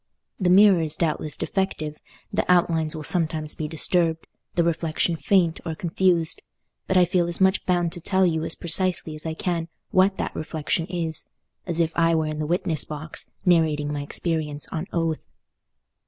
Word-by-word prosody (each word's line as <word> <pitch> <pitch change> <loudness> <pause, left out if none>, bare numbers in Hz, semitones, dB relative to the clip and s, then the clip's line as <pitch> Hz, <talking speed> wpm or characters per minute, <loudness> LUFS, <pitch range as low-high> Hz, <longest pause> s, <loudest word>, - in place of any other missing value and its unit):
The 185 -3 +2
mirror 195 -1 +6
is 155 -1 -2
doubtless 155 -2 -2
defective, 160 -6 -2 0.4
the 200 -2 +1
outlines 165 -3 +2
will 155 - -6
sometimes 155 -2 0
be 155 - -4
disturbed, 165 +1 +1 0.3
the 170 - +3
reflection 165 0 0
faint 170 -1 +2
or 165 -2 -4
confused; 170 -1 0 0.5
but 190 - +2
I 180 - +6
feel 175 -1 +1
as 170 - -1
much 190 0 +3
bound 175 -2 +1
to 175 - -6
tell 190 +2 +2
you 160 -2 0
as 165 - -2
precisely 175 -1 +1
as 155 +1 -7
I 160 - -3
can 170 -1 -2 0.2
what 190 +1 +3
that - - -3
reflection 160 +1 -2
is, 170 -3 -1 0.4
as 170 -1 -1
if 165 -1 +2
I 165 -1 +3
were 160 -1 +1
in 155 0 -4
the 155 - -2
witness 165 -3 +1
box, 155 +1 -6 0.2
narrating 155 -4 +2
my 145 - -3
experience 150 0 -2
on 165 +3 -4
oath. 165 -2 -1
165 Hz, 175 wpm, -24 LUFS, 155-180 Hz, 0.5 s, mirror